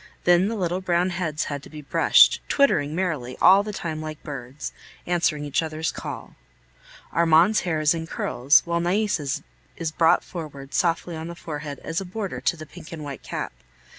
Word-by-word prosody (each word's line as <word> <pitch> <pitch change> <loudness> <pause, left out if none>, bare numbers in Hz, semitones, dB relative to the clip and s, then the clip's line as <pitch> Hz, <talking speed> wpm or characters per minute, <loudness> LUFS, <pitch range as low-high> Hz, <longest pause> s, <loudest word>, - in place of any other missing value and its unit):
Then 175 +2 +4
the 225 - -2
little 180 -2 -1
brown 180 0 +1
heads 165 -4 -2
had 145 -2 -4
to - - -13
be 150 -1 -10
brushed, - - +5
twittering 155 - +2
merrily 155 -9 -2
all 195 +2 +7
the 210 +1 -5
time 160 -5 -4
like 155 -1 -7
birds, 135 0 -7 0.3
answering 170 -4 0
each 145 - 0
other's 160 0 -2
call. - - -7 0.8
Armand's 170 +5 +4
hair 170 -4 -1
is 150 0 +4
in 165 -1 -4
curls, 135 -1 +3
while 170 0 0
Nais' 190 +3 +1 0.6
is 165 -2 -2
brought 165 +1 +3
forward 145 -5 -8
softly 170 0 0
on 160 +1 -6
the 170 - -7
forehead 150 -3 -6
as 165 +4 -2
a - - -6
border 195 +1 -5
to 170 - +1
the 155 - -8
pink 165 +1 -13
and 160 -2 -7
white 140 -2 -7
cap. - - -5
165 Hz, 185 wpm, -24 LUFS, 150-180 Hz, 0.8 s, all